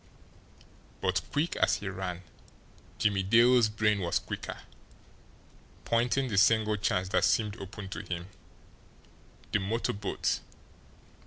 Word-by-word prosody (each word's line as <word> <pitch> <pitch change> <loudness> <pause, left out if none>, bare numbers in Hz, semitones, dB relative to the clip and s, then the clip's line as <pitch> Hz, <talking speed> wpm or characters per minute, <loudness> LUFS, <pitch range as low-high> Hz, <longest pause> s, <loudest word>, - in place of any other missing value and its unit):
But 90 +4 +1
quick 150 +4 0
as - - +3
he 100 - -6
ran, 90 -2 -4 0.7
Jimmie 100 -2 +2
Dale's 115 +3 +5
brain 105 -1 +1
was 85 -3 0
quicker, - - -5 1.3
pointing 120 +3 +1
the 100 -5 +2
single 110 0 +4
chance 90 -2 0
that - - +2
seemed 105 +2 +1
open 100 +1 -8
to - - -5
him. 90 0 -5 1.2
The 105 - +2
motor 110 +5 -1
boat! 100 -1 -1
105 Hz, 115 wpm, -29 LUFS, 95-115 Hz, 1.3 s, Dale's